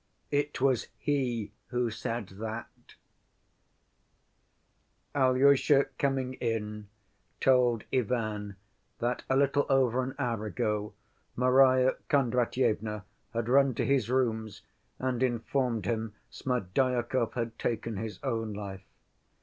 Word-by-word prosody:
"It 145 +1 0
Was 130 -3 +2
He 125 -8 -1 0.2
Who 120 -1 -1
Said 110 -1 -4
That" 110 +2 -7 2.2
Alyosha 135 +1 +4
coming 135 -2 0
in 105 -3 -2 0.5
told 125 -4 +3
Ivan 110 -5 -1 0.4
that 120 +1 -1
a 130 - +3
little 140 +1 +2
over 130 -2 +3
an 130 +1 -4
hour 115 -6 -1
ago 105 +2 -2 0.4
Marya 130 +1 +5
Kondratyevna 120 -5 +1 0.3
had 115 -1 -1
run 135 0 +4
to - - 0
his 135 -5 +2
rooms 110 -5 -1 0.3
and 130 -1 -1
informed 120 -2 0
him 110 -2 -2 0.2
Smerdyakov 125 +1 0
had 115 -2 -4
taken 115 -2 -2
his 105 -2 -5
own 115 -5 -2
life. 100 -2 -6
120 Hz, 105 wpm, -30 LUFS, 110-130 Hz, 2.2 s, Marya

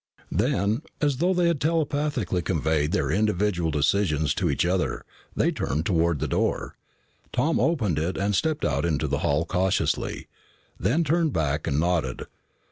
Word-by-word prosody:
Then, 100 +7 +1 0.2
as 145 -3 +1
though 175 +6 +2
they 175 -1 +2
had 170 -4 +1
telepathically 145 - 0
conveyed 80 -3 0
their 70 -2 0
individual 100 -3 +1
decisions 75 0 +1
to 90 -3 0
each 70 +3 +1
other, 90 +1 -1 0.3
they - - +2
turned 75 +4 -2
toward 85 -3 +2
the - - -2
door. - - -1 0.6
Tom 160 +2 +1
opened 110 - +1
it 85 +4 -2
and 100 +1 0
stepped 155 +4 0
out 70 0 0
into 80 -4 0
the - - -1
hall 75 +3 +1
cautiously, 95 +2 -1 0.5
then 130 - +2
turned 160 -1 +1
back 75 -1 -1
and 70 - +1
nodded. 80 -7 0
90 Hz, 155 wpm, -25 LUFS, -, 0.6 s, though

